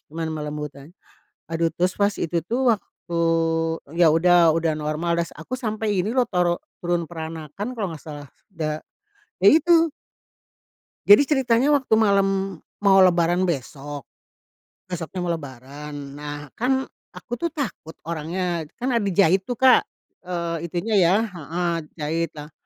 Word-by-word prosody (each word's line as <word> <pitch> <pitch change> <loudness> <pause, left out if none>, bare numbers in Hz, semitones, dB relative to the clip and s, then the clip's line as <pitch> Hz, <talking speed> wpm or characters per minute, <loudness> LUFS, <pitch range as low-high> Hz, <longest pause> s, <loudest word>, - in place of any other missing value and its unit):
cuma 165 +2 -5
melembutkan. 150 -2 -6 0.6
Aduh 165 0 +1
terus 180 +1 +1
pas 200 0 +2
itu 170 +1 -1
tuh 250 +1 +2
waktu 170 -3 -6 0.8
yaudah, 170 0 +5
udah 165 -1 +1
normal 155 +3 -1
udah 170 - 0
s - - -16
aku 195 +12 -6
sampai 215 -3 -1
ini 210 +6 -2
loh 250 - +4
toro 175 -2 +2 0.2
turun 175 -1 -2
peranakan 160 - -6
kalo 220 -4 -3
gak 140 - -16
salah 145 -3 -8 0.3
da 155 -1 -2 0.6
ya 190 - +4
itu. 330 +1 +5 1.2
Jadi 205 +7 +9
ceritanya 265 -2 +2
waktu 260 -5 +1
malam 195 -3 +2 0.2
mau 195 -1 +6
Lebaran 175 0 +3
besok. 145 -2 -4 0.9
Besoknya 180 0 -5
mau 175 - -1
Lebaran, 145 0 -7 0.2
nah 145 0 -5 0.2
kan 265 +2 +1 0.3
aku 240 - -9
tuh 335 - -1
takut 275 - -5
orangnya 170 +1 -3
kan 250 +2 -2
ada 230 -4 +1
jahit 190 0 +4
tuh, 245 - -2
Kak, 260 +2 +6 0.5
eee, 170 -2 -3
itunya 180 +6 -3
ya 185 - +4
heeh, 175 -3 -3 0.2
jahit 165 +1 -2
lah. 150 +1 -9
175 Hz, 140 wpm, -23 LUFS, 160-205 Hz, 1.2 s, Jadi